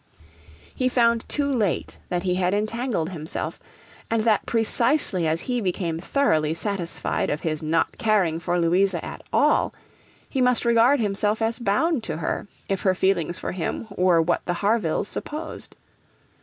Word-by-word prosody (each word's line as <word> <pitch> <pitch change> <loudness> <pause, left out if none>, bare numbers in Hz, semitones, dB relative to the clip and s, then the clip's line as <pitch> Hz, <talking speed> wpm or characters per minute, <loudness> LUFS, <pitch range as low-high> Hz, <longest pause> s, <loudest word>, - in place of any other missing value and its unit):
He 255 -1 0
found 235 -2 +2
too 290 - 0
late 215 -9 -1
that 175 0 -1
he 180 -2 +1
had 180 +1 +1
entangled 215 -4 -1
himself, 160 -3 -4 0.5
and 225 -1 +1
that 215 -3 +2
precisely 230 - +2
as 160 +2 0
he 245 -2 -2
became 175 -4 -2
thoroughly 160 - +1
satisfied 190 -2 -2
of 150 - -2
his 155 -2 -2
not 160 +1 0
caring 205 -9 +2
for 175 +1 -1
Louisa 180 +4 +2
at - - -7
all, - - +2 0.5
he 265 - -2
must 250 -1 +3
regard 235 +4 +4
himself 210 0 0
as 225 +2 -1
bound 240 +6 +1
to 155 -2 -3
her 170 - -3 0.2
if 195 -2 -1
her 190 -1 +2
feelings 175 -3 +1
for - - -4
him 185 +5 -3
were 180 -2 +4
what 170 +2 +1
the 175 - 0
Harvilles 200 -3 0
supposed. 300 +7 -6
195 Hz, 155 wpm, -24 LUFS, 170-230 Hz, 0.5 s, regard